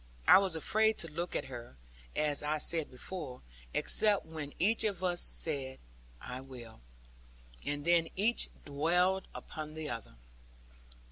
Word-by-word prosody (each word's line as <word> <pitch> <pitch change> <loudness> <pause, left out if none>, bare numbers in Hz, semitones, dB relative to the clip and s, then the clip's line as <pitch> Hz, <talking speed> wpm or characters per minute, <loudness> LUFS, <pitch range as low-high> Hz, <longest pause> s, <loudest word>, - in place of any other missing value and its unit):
I - - +9
was 190 -4 -1
afraid 220 +7 +2
to 165 - -3
look 170 +3 -4
at - - -1
her, 120 - -9 0.4
as 150 -1 +2
I 150 +1 0
said 160 0 +2
before, 130 0 -5 0.3
except 210 - +4
when 155 -3 -7
each 220 +5 +2
of 200 -4 -1
us 175 -1 +1
said, 135 -4 -2 0.4
'I 125 +1 -7
will,' 120 - -11 0.9
and 145 0 -2
then 170 -1 +4
each 220 +5 +3 0.2
dwelled 180 +6 +1
upon 155 -2 -7
the 155 -3 -4
other. 115 - -7
155 Hz, 140 wpm, -32 LUFS, 140-185 Hz, 0.9 s, I